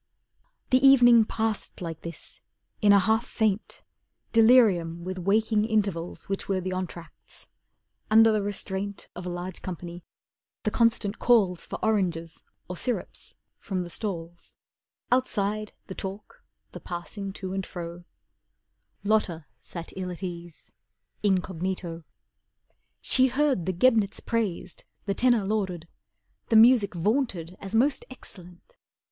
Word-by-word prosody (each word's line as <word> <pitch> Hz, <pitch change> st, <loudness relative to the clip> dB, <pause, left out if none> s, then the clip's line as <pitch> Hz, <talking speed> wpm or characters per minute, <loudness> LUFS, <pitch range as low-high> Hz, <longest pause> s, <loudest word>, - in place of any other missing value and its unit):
The 255 Hz, -, +6 dB
evening 245 Hz, -4 st, +7 dB
passed 220 Hz, -1 st, -3 dB
like 165 Hz, -3 st, -6 dB
this, 170 Hz, 0 st, -9 dB, 0.4 s
in 205 Hz, -2 st, +6 dB
a 200 Hz, -, +8 dB
half 220 Hz, +4 st, +2 dB
faint, 220 Hz, -4 st, -2 dB, 0.5 s
Delirium 215 Hz, -8 st, +4 dB
with 185 Hz, +1 st, -5 dB
waking 210 Hz, +3 st, +2 dB
intervals 200 Hz, -6 st, -2 dB
Which 195 Hz, 0 st, -3 dB
were 195 Hz, -1 st, +1 dB
the 185 Hz, 0 st, -4 dB
entr'acts. 180 Hz, -2 st, -8 dB, 0.6 s
Under 225 Hz, +1 st, +7 dB
the 215 Hz, -1 st, +1 dB
restraint 200 Hz, 0 st, -4 dB
Of 180 Hz, 0 st, -6 dB
a -, -, -2 dB
large 175 Hz, +1 st, -6 dB
company, 175 Hz, -1 st, -7 dB, 0.6 s
the 215 Hz, -, 0 dB
constant 230 Hz, -3 st, +1 dB
calls 200 Hz, -8 st, +3 dB
For -, -, -5 dB
oranges 175 Hz, -7 st, -1 dB, 0.3 s
or 180 Hz, -, -6 dB
syrops 245 Hz, +4 st, -4 dB, 0.2 s
from 185 Hz, -2 st, -3 dB
the 175 Hz, -, -9 dB
stalls 170 Hz, -5 st, -6 dB, 0.6 s
Outside, 215 Hz, -4 st, 0 dB
the 190 Hz, -, -7 dB
talk, 195 Hz, +2 st, -8 dB, 0.3 s
the -, -, -8 dB
passing 195 Hz, +3 st, -6 dB
to 190 Hz, -1 st, -5 dB
and 195 Hz, 0 st, -2 dB
fro, 175 Hz, -1 st, -7 dB, 1.0 s
Lotta 200 Hz, -7 st, +1 dB, 0.2 s
sat 170 Hz, -2 st, -8 dB
ill 185 Hz, -1 st, -4 dB
at 180 Hz, +1 st, -8 dB
ease, 175 Hz, -2 st, -8 dB, 0.5 s
incognito. 185 Hz, -3 st, -2 dB, 1.0 s
She 260 Hz, 0 st, +4 dB
heard 265 Hz, -, +1 dB
the -, -, +2 dB
Gebnitz 215 Hz, +1 st, +2 dB
praised, 210 Hz, -6 st, -3 dB, 0.2 s
the 200 Hz, -, 0 dB
tenor 240 Hz, -1 st, +3 dB
lauded, 190 Hz, -5 st, -2 dB, 0.6 s
The 225 Hz, -, +3 dB
music 220 Hz, -4 st, +6 dB
vaunted 185 Hz, -, -1 dB
as 195 Hz, +2 st, -5 dB
most 265 Hz, +5 st, +2 dB
excellent. 185 Hz, -, -14 dB
195 Hz, 130 wpm, -27 LUFS, 175-220 Hz, 1.0 s, a